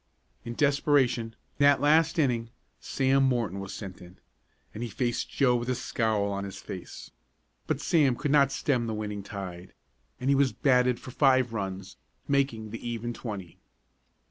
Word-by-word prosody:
In 120 0 -6
desperation, 140 -5 +2 0.2
that 140 -1 +5
last 155 +4 +3
inning, 120 -7 +1 0.3
Sam 135 0 +1
Morton 120 -7 +1
was 100 -1 -6
sent 95 -4 -8
in, 90 +1 -14 0.6
and 110 - -7
he 120 - -3
faced 120 +2 -2
Joe 125 -3 +2
with 120 +1 -2
a 125 - +1
scowl 110 -4 0
on 100 0 -3
his 100 -1 -7
face. 90 - -9 0.6
But - - 0
Sam 145 -7 +3
could 145 +3 -2
not 140 -2 +5
stem 125 -6 0
the 110 - -2
winning 105 -1 -4
tide, 95 -2 -8 0.4
and 130 - -4
he - - +4
was 135 -2 +2
batted 125 -3 +2
for 130 - -10
five 130 -3 +3
runs, 95 -3 -5 0.3
making 135 -6 0
the 115 - -7
even 120 0 -3
twenty. 100 -8 -7
120 Hz, 165 wpm, -28 LUFS, 105-135 Hz, 0.6 s, that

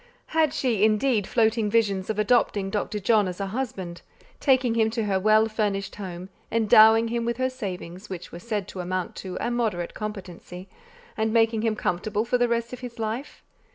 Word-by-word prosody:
Had 315 -2 +3
she, 230 -6 0
indeed, 215 0 +2
floating 220 -2 +2
visions 205 -4 +1
of 215 - -1
adopting 210 -3 +2
Dr. 210 0 -2
John 210 0 +3
as 180 +1 -6
a 200 - -1
husband, 195 -6 -5 0.4
taking 260 -4 +3
him 220 -1 +2
to 225 0 -2
her 195 -2 +1
well 215 +2 +4
furnished 205 -3 -2
home, 185 -2 -7 0.2
endowing 225 0 +6
him 235 0 -1
with 235 0 -2
her 260 0 0
savings, 190 -6 -7
which 180 -2 -7
were 170 - -8
said 210 -1 -3
to 190 - -8
amount 180 0 -3
to 185 -1 -6
a 235 - -1
moderate 215 -8 -1
competency, 185 -3 -7 0.5
and 220 0 0
making 225 -1 +3
him 225 -1 0
comfortable 210 +3 -1
for 245 +1 +1
the 245 - +3
rest 235 +1 -1
of 250 - -6
his 245 -2 -8
life? 225 +5 -5
215 Hz, 190 wpm, -25 LUFS, 195-230 Hz, 0.5 s, endowing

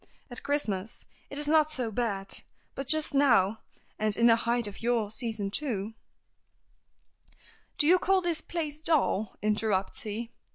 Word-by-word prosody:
At 245 - -3
Christmas 220 -8 -3 0.2
it 280 - -3
is 295 0 -1
not 310 0 +4
so 250 -6 -1
bad, 200 -4 -2 0.3
but 275 - -5
just 310 +1 +3
now, 225 -7 +4 0.4
and 215 -2 0
in 235 - +3
the 230 -1 +7
height 235 +1 0
of 205 -1 -6
your 230 -3 0
season, 220 -4 -2
too, 220 -5 -2 0.9
" - - -31
"Do 295 - +2
you 360 +4 +6
call 385 +1 +3
this 340 -3 0
place 310 -4 -4
dull?" 285 - +1
interrupts 210 -2 0
he. 225 +2 -5
235 Hz, 155 wpm, -29 LUFS, 210-295 Hz, 0.9 s, the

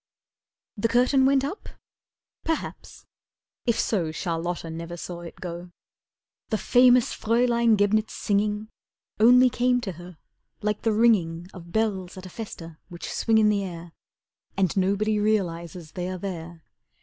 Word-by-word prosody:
The 205 - +1
curtain 255 +3 +3
went 270 -1 +3
up? 305 +10 -5 0.7
Perhaps. 325 -1 -4 0.6
If 235 - +2
so, 175 -8 0
Charlotta 165 +1 -3
never 170 +1 -6
saw 175 0 -6
it 170 - -9
go. 175 0 -7 0.8
The 220 - +1
famous 245 +2 +4
Fraeulein 235 0 +2
Gebnitz' 215 +2 +2
singing 210 +1 0 0.5
Only 250 +3 +7
came 245 +1 +2
to 205 -5 -4
her 175 0 -12 0.5
like 210 0 -1
the 225 - +1
ringing 195 -7 +2
Of 170 -2 -11
bells 195 -4 -1
at 185 - -9
a - - -8
festa 165 -8 -8
Which 175 -1 -7
swing 225 -1 +2
in 215 -1 +5
the 205 -1 +1
air 170 -2 -7 0.7
And 190 -4 +1
nobody 200 +3 +1
realizes 175 -6 -1
they 180 0 -4
are 185 - -4
there. 170 -3 -7
200 Hz, 140 wpm, -25 LUFS, 175-225 Hz, 0.8 s, Only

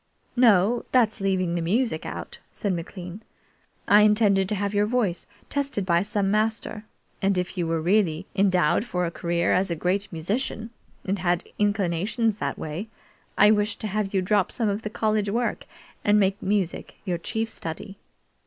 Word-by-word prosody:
"No; 230 -1 +4
that's 225 -4 +2
leaving 185 -3 +1
the 175 - -1
music 195 0 0
out," - - -7
said 200 -3 -2
McLean. 175 +3 -7 0.7
"I 205 +1 +7
intended 210 -3 +4
to 210 - 0
have 200 +1 -2
your 205 0 +2
voice 215 -7 -1 0.2
tested 280 -9 -1
by 170 -2 +3
some 200 0 0
master, 215 0 -1 0.4
and 195 -1 +2
if 180 +1 -2
you 175 -3 -1
really 165 +1 +1
were - - -4
endowed 185 -3 +3
for 180 -7 -2
a 170 - -3
career 170 0 0
as 185 +1 +2
a 170 - -1
great 185 +5 -1
musician, 215 +6 -3 0.3
and 195 +1 -1
had 175 -1 +1 0.2
inclinations 205 +2 0
that - - -2
way, 160 +8 -5 0.5
I 210 +1 +7
wished 210 0 +1
to 215 - -2
have 205 0 -1
you 190 -2 +1
drop 200 0 +2
some 225 -3 0
of 200 +2 -2
the 215 - -4
college 215 -1 0
work 235 +3 -1 0.4
and 210 0 +4
make 195 0 +1
music 195 -3 -1
your 175 -3 -1
chief 225 +6 -2
study. 195 0 -7
200 Hz, 170 wpm, -25 LUFS, 180-215 Hz, 0.7 s, I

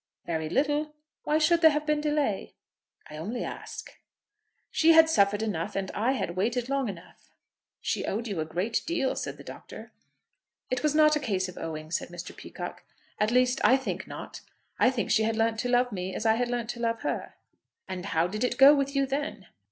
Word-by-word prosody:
"Very 160 -2 -2
little. 295 - 0 0.3
Why 300 - +2
should 335 +2 +3
there 320 - +9
have 300 0 -1
been 300 0 +1
delay?" 295 -9 -1 0.5
"I 150 - -9
only 215 +10 -4
ask." - - -7 0.8
"She 330 +1 +5
had 320 0 +8
suffered 205 -4 +3
enough, 175 -7 -3
and 195 -1 -2
I 235 +6 +1
had 175 -9 -3
waited 240 +6 -1
long 275 -4 0
enough." 175 -4 -11 0.5
"She - - -2
owed 225 +4 -2
you 200 -6 -3
a 155 - -1
great 180 +8 -1
deal," 320 -6 0
said - - -4
the - - -11
Doctor. - - -10 0.8
"It 255 - 0
was 305 -1 +1
not 305 0 +6
a - - +1
case 195 -9 -1
of 180 - -9
owing," 155 -1 -6
said - - -1
Mr. 175 0 -8
Peacocke. - - -8 0.4
"At 210 - +2
least 250 +1 +2
I 260 - +6
think 265 - -4
not. - - -8 0.4
I - - +6
think 255 -3 -2
she 220 - +4
had 220 +1 +1
learnt 225 0 +1
to 245 - -1
love 245 0 +3
me 185 -1 -4
as - - -4
I 220 - +5
had 245 +2 0
learnt 240 -1 -2
to 240 - -10
love 230 -1 -1
her." - - -3 0.5
"And 185 0 -5
how 165 -3 +2
did 210 +6 -3
it 250 - 0
go 280 +1 +9
with 280 -1 0
you 275 0 +3
then?" 275 -6 -3
240 Hz, 205 wpm, -28 LUFS, 195-280 Hz, 0.8 s, there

